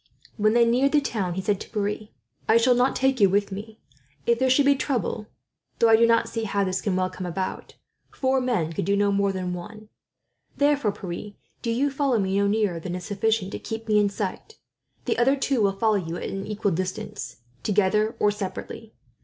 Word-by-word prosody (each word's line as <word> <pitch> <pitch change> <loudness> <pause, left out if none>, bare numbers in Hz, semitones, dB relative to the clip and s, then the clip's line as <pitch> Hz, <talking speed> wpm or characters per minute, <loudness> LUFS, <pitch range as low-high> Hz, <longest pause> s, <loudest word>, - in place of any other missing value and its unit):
When 215 0 +2
they 235 -1 +6
neared 255 +5 +2
the 300 - +6
town, 200 -10 -2
he 190 - -3
said 200 0 0
to - - -8
Pierre: 210 0 -2 0.4
"I 220 - +6
shall 245 +2 +4
not 245 +2 +2
take 265 -1 +1
you 200 -2 +6
with 200 +1 +1
me. 210 +3 -7 0.5
If 235 0 +2
there 260 0 +2
should 275 +2 +4
be 280 - +6
trouble 255 -6 -2 0.5
though 230 - +4
I 225 - +8
do 230 +1 +5
not 230 0 +3
see 225 -1 -3
how 200 -1 0
this 185 -1 -1
can 200 -3 -1
well 185 0 0
come 185 - -6
about 185 +2 -4 0.4
four 260 0 +1
men 215 -11 0
could 160 - -2
do 200 +2 +2
no 205 0 +2
more 200 0 +2
than 185 -1 -3
one. 210 +5 -9 0.7
Therefore, 285 -6 +2
Pierre, 195 +2 -7 0.3
do 235 - -3
you 265 +5 +1
follow 275 -3 +1
me 190 -2 0
no 200 - +2
nearer 205 -5 +1
than 175 +2 -5
is 180 - -6
sufficient 210 -1 0
to - - -5
keep 225 0 -6
me 210 -1 +4
in 205 -1 +3
sight. 200 - -5 0.5
The - - 0
other 265 +3 +4
two 270 -3 0
will 200 -1 +3
follow 215 0 +2
you 170 -3 -4
at - - -6
an 195 +1 -5
equal 210 -1 -1
distance, 185 +4 -4 0.3
together 210 +2 +1
or 210 - +3
separately. 205 +2 -7
210 Hz, 215 wpm, -25 LUFS, 195-235 Hz, 0.7 s, I